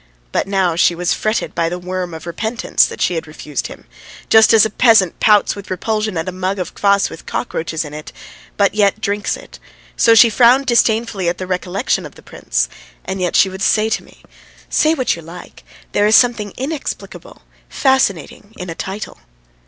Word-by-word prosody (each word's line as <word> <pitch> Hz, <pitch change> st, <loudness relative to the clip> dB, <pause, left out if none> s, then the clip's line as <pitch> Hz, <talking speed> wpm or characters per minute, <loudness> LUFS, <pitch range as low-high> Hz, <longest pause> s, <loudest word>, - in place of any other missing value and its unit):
But -, -, -1 dB
now 190 Hz, -4 st, +1 dB
she 170 Hz, +1 st, +3 dB
was 180 Hz, +1 st, 0 dB
fretted 215 Hz, +1 st, -2 dB
by 165 Hz, -1 st, 0 dB
the 175 Hz, -, -4 dB
worm 180 Hz, -1 st, -5 dB
of 160 Hz, -, -10 dB
repentance 220 Hz, +7 st, 0 dB
that -, -, -4 dB
she -, -, +1 dB
had 165 Hz, -1 st, -4 dB
refused 150 Hz, -2 st, -5 dB
him; -, -, -13 dB, 0.4 s
just 220 Hz, 0 st, +6 dB
as 225 Hz, -2 st, +6 dB
a 220 Hz, -, -3 dB
peasant 220 Hz, -7 st, +3 dB
pouts 210 Hz, -2 st, +3 dB
with 200 Hz, -1 st, -10 dB
repulsion 215 Hz, 0 st, -2 dB
at 160 Hz, -, -3 dB
a -, -, -2 dB
mug 185 Hz, +2 st, -3 dB
of 180 Hz, -, -5 dB
kvass 200 Hz, -1 st, +2 dB
with -, -, -12 dB
cockroaches 160 Hz, 0 st, -3 dB
in 150 Hz, -, -9 dB
it 150 Hz, 0 st, -8 dB, 0.5 s
but 200 Hz, -1 st, +2 dB
yet 205 Hz, 0 st, +2 dB
drinks 205 Hz, -1 st, -2 dB
it, -, -, -14 dB, 0.4 s
so 230 Hz, -1 st, +4 dB
she 230 Hz, +1 st, +7 dB
frowned 250 Hz, +4 st, +4 dB
disdainfully 225 Hz, -6 st, +1 dB
at 175 Hz, -, -3 dB
the 185 Hz, -, -5 dB
recollection 180 Hz, +1 st, -2 dB
of -, -, -11 dB
the -, -, -16 dB
prince, -, -, -2 dB, 0.4 s
and 190 Hz, 0 st, -4 dB
yet 180 Hz, -, -1 dB
she -, -, +5 dB
would 190 Hz, 0 st, -8 dB
say 215 Hz, +2 st, +2 dB
to 220 Hz, -, -2 dB
me: -, -, -21 dB, 0.5 s
"Say 310 Hz, +1 st, +3 dB
what 255 Hz, -5 st, 0 dB
you 170 Hz, -, -10 dB
like, 170 Hz, +2 st, -12 dB, 0.3 s
there 205 Hz, 0 st, +2 dB
is 215 Hz, -, +5 dB
something 230 Hz, -5 st, +2 dB
inexplicable, 285 Hz, +3 st, -6 dB, 0.3 s
fascinating, 215 Hz, -, 0 dB
in 180 Hz, -2 st, -6 dB
a -, -, -4 dB
title. 195 Hz, +4 st, -6 dB
195 Hz, 195 wpm, -17 LUFS, 175-220 Hz, 0.5 s, she